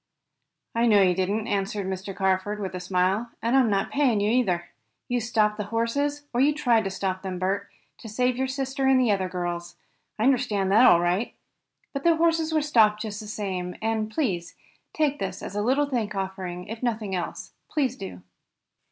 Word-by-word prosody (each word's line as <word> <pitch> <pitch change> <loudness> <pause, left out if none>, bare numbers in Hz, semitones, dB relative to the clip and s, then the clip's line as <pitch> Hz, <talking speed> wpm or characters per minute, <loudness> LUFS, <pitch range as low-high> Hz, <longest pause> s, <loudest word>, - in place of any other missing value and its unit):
"I 235 +1 +2
know 205 -3 +6
you 180 -1 +4
didn't," 195 +4 -1
answered 200 0 -1
Mr. 190 +1 -5
Carford, 190 +2 0
with 190 -3 -4
a 180 - -4
smile, 185 +5 0
"and 235 +3 +1
I'm 260 -4 +5
not 195 -1 0
paying 265 -7 +2
you 205 +1 +1
either. 185 -9 +1 0.4
You 245 -1 0
stopped 215 -2 +1
the 210 - -3
horses, 280 +7 -1
or 240 - +2
you 290 +2 +4
tried 235 -7 +2
to - - 0
stop 190 -1 -3
them, 185 -1 -4
Bert, 195 +2 -1 0.3
to 225 - -9
save 250 +3 +1
your 265 +1 -1
sister 265 0 -2
and 265 -1 +5
the 245 -4 +3
other 190 -2 0
girls. 175 -1 -4 0.4
I 215 - -1
understand 235 -7 +2
that 225 +5 +7
all 170 - +7
right. 180 +6 0 0.6
But 275 -1 -4
the 335 -1 +5
horses 325 -1 +2
were 310 -2 +2
stopped 215 -7 +3
just 210 -2 -5
the 215 - -8
same, 190 -4 -4
and 220 -1 -1
please 205 - -2 0.4
take 295 -2 0
this 195 - -4
as 200 - -6
a 205 - 0
little 265 +6 +2
thank 230 -7 -2
offering, 190 -2 -4
if 225 +1 -7
nothing 220 -5 -2
else. 180 -2 -4 0.2
Please 270 -5 0
do." 140 - -8
215 Hz, 195 wpm, -26 LUFS, 190-250 Hz, 0.6 s, that